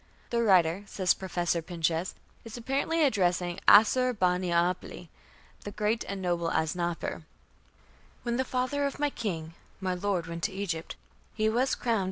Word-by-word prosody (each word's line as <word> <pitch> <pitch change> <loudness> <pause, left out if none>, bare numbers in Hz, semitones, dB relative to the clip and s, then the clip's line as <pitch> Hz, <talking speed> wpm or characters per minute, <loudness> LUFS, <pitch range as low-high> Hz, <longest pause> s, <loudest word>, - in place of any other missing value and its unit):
"The 235 -1 +2
writer", 185 -3 +4
says 185 -2 +2
Professor 175 -2 -1
Pinches, 165 +1 -2 0.3
"is 230 0 -8
apparently 280 +7 0
addressing 180 -7 +1
Assur 250 +4 +6
bani 180 -3 +1
apli, 170 +1 -1 0.5
'the 205 - -6
great 215 +2 0
and 200 0 -4
noble 175 -2 0
Asnapper': 170 +1 -2 1.0
"When 240 -1 -1
the 260 - +2
father 260 +3 -1
of 280 - -6
my 290 0 0
king 165 -10 -4 0.3
my 190 -1 -1
lord 180 -2 -1
went 170 0 -6
to 205 - -1
Egypt, 190 -4 -4 0.4
he 215 0 +2
was 250 +4 +1
crowned 230 -3 0
190 Hz, 150 wpm, -29 LUFS, 175-235 Hz, 1.0 s, Assur